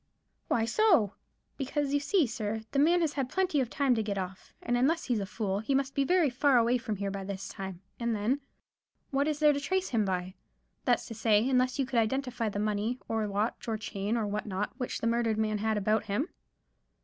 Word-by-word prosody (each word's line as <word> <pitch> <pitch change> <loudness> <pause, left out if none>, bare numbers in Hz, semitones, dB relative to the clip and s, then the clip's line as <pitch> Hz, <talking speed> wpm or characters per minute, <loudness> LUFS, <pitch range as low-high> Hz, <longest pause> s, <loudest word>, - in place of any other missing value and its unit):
"Why 225 -1 +2
so?" 265 - +3 0.4
"Because, 285 +1 -1
you 285 - +3
see, 335 +3 +2
sir, 220 -2 -3
the 275 - +1
man 340 +4 +4
has 315 -3 +1
had 270 -3 -2
plenty 370 -4 +1
of 245 - -2
time 275 -1 +2
to 225 - +1
get 205 -2 -2
off; 185 0 -6
and 245 - -1
unless 300 +7 +2
he's 240 -5 0
a 195 - -3
fool, 200 -2 -2
he 245 +6 0
must 275 0 0
be 280 - +2 0.3
far 260 +1 +3
away 240 +1 +3
from 225 -3 -3
here 200 0 -3
by 195 0 -4
this 195 0 -5
time, 190 -2 -7 0.2
and 235 -1 0
then 235 +7 0 0.7
what 280 +1 +1
is 305 -2 0
there 300 -1 +5
to 285 - -1
trace 375 +6 -1
him 225 -3 +2
by—that's 185 -1 -3
to 230 - -7
say, 215 +1 +3
unless 255 0 +2
you 275 - +1
could 250 -2 +1
identify 240 0 0
the 205 - -5
money, 210 +3 0
or 220 -1 0
watch 210 +5 -2
and 220 -1 -1
chain, 210 +1 -2
or 225 - 0
what 210 +1 -3
not, 200 +1 -2
which 250 - -3
the - - -1
murdered 230 -1 +1
man 215 -1 0
had 220 0 0
about 215 +1 +1
him?" 220 - -1
230 Hz, 220 wpm, -30 LUFS, 210-275 Hz, 0.7 s, there